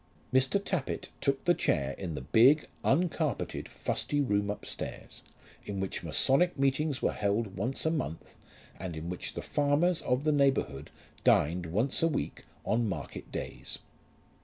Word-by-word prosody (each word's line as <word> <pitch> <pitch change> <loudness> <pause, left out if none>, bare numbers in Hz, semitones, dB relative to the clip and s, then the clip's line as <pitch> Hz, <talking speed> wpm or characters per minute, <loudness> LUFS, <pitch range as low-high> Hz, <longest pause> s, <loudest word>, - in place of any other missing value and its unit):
Mr. 130 +8 +4
Tappitt 185 -7 -3
took 135 -1 0
the 175 - +6
chair 70 - +1
in 85 -5 -5
the 65 - -4
big, 125 - +5 0.2
uncarpeted, 160 - 0
fusty 145 - -1
room 105 -7 +1
upstairs, 105 - -6 0.4
in 100 -1 -4
which 95 0 -2
masonic 135 - +2
meetings 140 +1 +1
were - - +3
held 100 0 -1
once 120 - -2
a 160 - +3
month, 150 - -4 0.4
and 90 -3 -5
in 85 +3 -4
which 90 - -4
the - - -4
farmers 150 +4 +2
of 125 +2 0
the 155 - +3
neighbourhood 135 - +1 0.3
dined 85 +3 +3
once 110 +11 +1
a 165 - +5
week, 160 - -3 0.2
on 115 0 +1
market 75 -8 -6
days. - - -4
130 Hz, 150 wpm, -30 LUFS, 95-145 Hz, 0.4 s, the